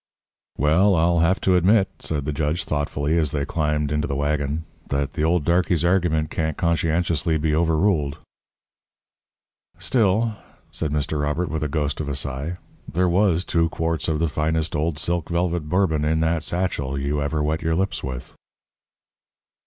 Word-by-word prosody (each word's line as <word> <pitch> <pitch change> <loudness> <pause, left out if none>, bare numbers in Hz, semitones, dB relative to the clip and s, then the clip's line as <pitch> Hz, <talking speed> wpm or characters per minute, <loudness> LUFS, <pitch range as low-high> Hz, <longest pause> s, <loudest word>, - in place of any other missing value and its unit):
"Well, 85 +8 +4
I'll 85 +1 +3
have 85 +4 +3
to 95 - +3
admit," 95 +3 +4
said 75 -3 -3
the 75 - -2
judge, 75 +3 -1
thoughtfully, 75 +1 -1
as 75 -3 0
they 70 -2 -1
climbed 75 -2 -1
into 75 0 0
the 70 - -2
waggon, 75 +1 -1 0.2
"that 70 0 -1
the 75 - -2
old 85 0 +2
darkey's 85 -1 +2
argument 85 -4 +1
can't 80 -2 -2
conscientiously 85 -1 +1
be 80 0 0
overruled." 80 -2 +1 1.6
"Still," 110 -2 +1 0.3
said 75 - -3
Mr. 75 0 -1
Robert, 75 +4 -1
with 80 -1 -3
a 75 - 0
ghost 75 0 -1
of 75 - -4
a 70 - -2
sigh, 70 +5 -3 0.3
"there 90 +2 +2
was 90 0 +2
two 85 -1 +1
quarts 80 0 -2
of 80 -2 +1
the 85 +2 +1
finest 80 +2 -1
old 75 +1 0
silk 85 +1 -1
velvet 85 -2 -1
Bourbon 90 -4 +1
in 80 +1 +1
that 80 0 +1
satchel 75 -6 -2
you 70 +2 -1
ever 75 +1 -1
wet 80 +1 -1
your 80 0 0
lips 90 -4 -1
with." 65 -2 -6
80 Hz, 165 wpm, -23 LUFS, 75-85 Hz, 1.6 s, Well